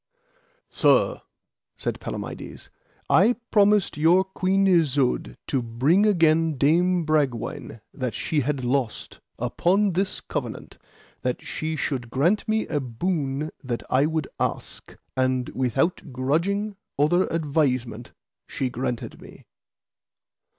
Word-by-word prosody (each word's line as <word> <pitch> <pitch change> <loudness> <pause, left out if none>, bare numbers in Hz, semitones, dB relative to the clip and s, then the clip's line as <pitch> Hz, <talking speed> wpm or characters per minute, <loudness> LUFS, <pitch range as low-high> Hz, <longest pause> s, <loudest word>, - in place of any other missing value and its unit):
Sir, - - +3 0.6
said - - -3
Palamides, - - -7 0.4
I 245 - +5 0.2
promised 205 -5 +3
your 170 +5 +5
Queen 190 +1 0
Isoud 145 -8 +2
to 135 - 0
bring 135 - +2
again 165 -5 +3
Dame 170 +5 +3
Bragwaine 135 -7 -1
that 125 -4 -3
she 155 - -1
had 140 -1 -1
lost, 125 -3 -2 0.2
upon 180 - +1
this 190 +2 -1
covenant, - - -6 0.4
that 125 -1 -2
she 160 0 -3
should 130 -5 -3
grant 165 - +1
me 220 0 +1
a 150 - -1
boon 140 +2 -2
that 120 -3 -3
I 135 +3 +4
would 160 -3 -2
ask, - - -4 0.2
and 130 -1 0
without 135 - -1
grudging, 180 +11 -1 0.2
outher 175 +6 +3
advisement, 135 -7 -1 0.4
she 130 -2 -3
granted 125 -1 -4
me. - - -14
150 Hz, 115 wpm, -24 LUFS, 130-180 Hz, 0.6 s, I